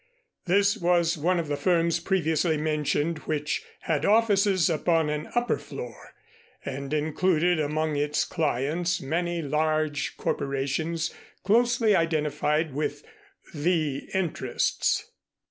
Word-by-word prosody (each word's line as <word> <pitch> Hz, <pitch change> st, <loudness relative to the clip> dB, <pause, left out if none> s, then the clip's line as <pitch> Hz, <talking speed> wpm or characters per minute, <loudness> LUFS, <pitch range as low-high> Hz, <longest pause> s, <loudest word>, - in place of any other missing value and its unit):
This 200 Hz, +4 st, +3 dB
was 175 Hz, -2 st, +2 dB
one 170 Hz, +3 st, +1 dB
of 165 Hz, -, -3 dB
the 145 Hz, -, -1 dB
firms 170 Hz, +2 st, +2 dB
previously 165 Hz, -2 st, +1 dB
mentioned 150 Hz, +1 st, 0 dB
which 150 Hz, -1 st, -1 dB, 0.2 s
had 155 Hz, -3 st, -1 dB
offices 200 Hz, -5 st, +3 dB
upon 160 Hz, -1 st, +1 dB
an 150 Hz, 0 st, -4 dB
upper 240 Hz, 0 st, +1 dB
floor -, -, -9 dB, 0.5 s
and 140 Hz, +1 st, -5 dB
included 160 Hz, +3 st, +1 dB
among 155 Hz, +1 st, -1 dB
its 150 Hz, +1 st, 0 dB
clients 160 Hz, +3 st, -1 dB
many 170 Hz, +4 st, -2 dB
large 155 Hz, 0 st, 0 dB
corporations 140 Hz, +4 st, -2 dB, 0.3 s
closely 230 Hz, +1 st, +3 dB
identified 155 Hz, -2 st, 0 dB
with 150 Hz, -, -3 dB, 0.5 s
"The 155 Hz, -3 st, -1 dB
Interests." 185 Hz, -4 st, 0 dB
160 Hz, 110 wpm, -26 LUFS, 150-180 Hz, 0.5 s, This